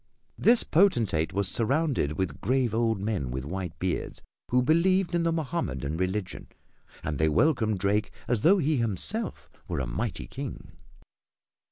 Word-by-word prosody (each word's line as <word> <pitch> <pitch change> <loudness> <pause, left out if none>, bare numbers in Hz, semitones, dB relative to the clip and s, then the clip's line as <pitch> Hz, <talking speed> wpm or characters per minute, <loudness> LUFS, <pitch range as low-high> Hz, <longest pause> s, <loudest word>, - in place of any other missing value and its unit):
This 235 +1 +5
potentate 120 - +2
was 100 0 0
surrounded 125 - +1
with 95 +3 -3
grave 125 +1 +1
old 115 -2 +1
men 100 - -2
with 65 +1 -4
white 90 +1 -5
beards, 90 -2 -3 0.3
who 125 0 +3
believed 175 +5 +2
in 170 - +2
the 165 0 +1
Mohammedan 105 - -2
religion, 95 +2 -3 0.6
and 75 - -3
they 80 0 +3
welcomed 110 - +2
Drake 100 +2 0 0.2
as 120 -3 +1
though 190 - +5
he 155 -3 +1
himself 120 - -1 0.2
were - - -2
a 65 - -1
mighty - - -3
king. - - -7
110 Hz, 150 wpm, -27 LUFS, -, 0.6 s, This